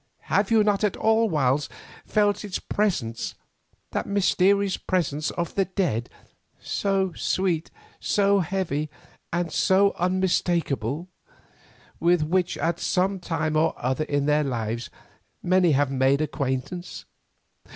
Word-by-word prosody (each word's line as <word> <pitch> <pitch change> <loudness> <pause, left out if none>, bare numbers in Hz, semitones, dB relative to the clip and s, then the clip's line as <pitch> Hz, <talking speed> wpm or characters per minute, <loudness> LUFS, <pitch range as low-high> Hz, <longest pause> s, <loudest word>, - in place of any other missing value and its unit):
Have 200 0 +3
you 225 -2 +5
not 205 0 +1
at 205 -3 +1
whiles 160 - +2 0.4
felt 205 -1 +1
its 200 -3 -3
presence, 150 - -2 0.6
that - - -2
mysterious 200 0 +2
presence 155 -5 -1
of 170 -1 -3
the 195 - +1
dead, 175 - -1 0.5
so 195 -2 -1
sweet, 175 -3 -1 0.3
so 200 -1 +2
heavy, 170 -5 -2 0.4
and 170 -1 -1
so 195 +3 +3
unmistakable, 175 - 0 0.9
with 170 -2 +3
which 180 +3 0
at 170 +1 -1
some 190 +1 0
time 160 -3 -2
or 160 +1 +2
other 130 +5 -1
in 145 -2 0
their 150 +1 +3
lives 115 -3 -3 0.5
many 180 -2 +3
have 140 0 +2
made 135 +1 +2
acquaintance? 150 +4 -3
175 Hz, 120 wpm, -25 LUFS, 145-195 Hz, 0.9 s, you